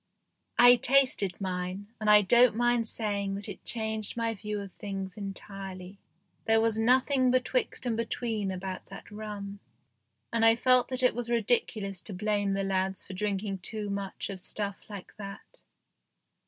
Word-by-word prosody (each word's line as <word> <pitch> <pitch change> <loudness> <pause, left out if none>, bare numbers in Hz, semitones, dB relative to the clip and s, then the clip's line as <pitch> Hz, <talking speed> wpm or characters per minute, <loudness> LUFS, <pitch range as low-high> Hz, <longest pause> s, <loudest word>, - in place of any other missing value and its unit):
I 245 0 +8
tasted 255 -8 +2
mine, 185 +1 -4
and 215 -1 0
I 210 0 +8
don't 240 +3 +5
mind 240 -1 +2
saying 200 -3 -1
that 200 +1 -3
it - - -8
changed 220 -1 -2
my 230 -1 0
view 210 0 -4
of 200 -1 -7
things 195 -2 -6
entirely. 195 -1 -7 0.5
There 225 0 +4
was 225 -1 +1
nothing 255 +3 +3
betwixt 255 0 0
and 235 -2 0
between 225 -2 -2
about 185 0 -5
that 195 - -11
rum, 205 -1 -7 0.7
and 230 -1 +2
I 225 0 +7
felt 250 +1 +4
that 255 0 -2
it 250 - +5
was 240 +1 -4
ridiculous 215 -4 0
to 200 - -7
blame 205 0 0
the 195 0 -1
lads 190 0 -1
for 190 - -10
drinking 195 0 -2
too 210 +2 -5
much 200 0 -4
of 190 -2 -8
stuff 200 0 -4
like 200 -3 -9
that. 200 -1 -10
210 Hz, 160 wpm, -29 LUFS, 195-230 Hz, 0.7 s, I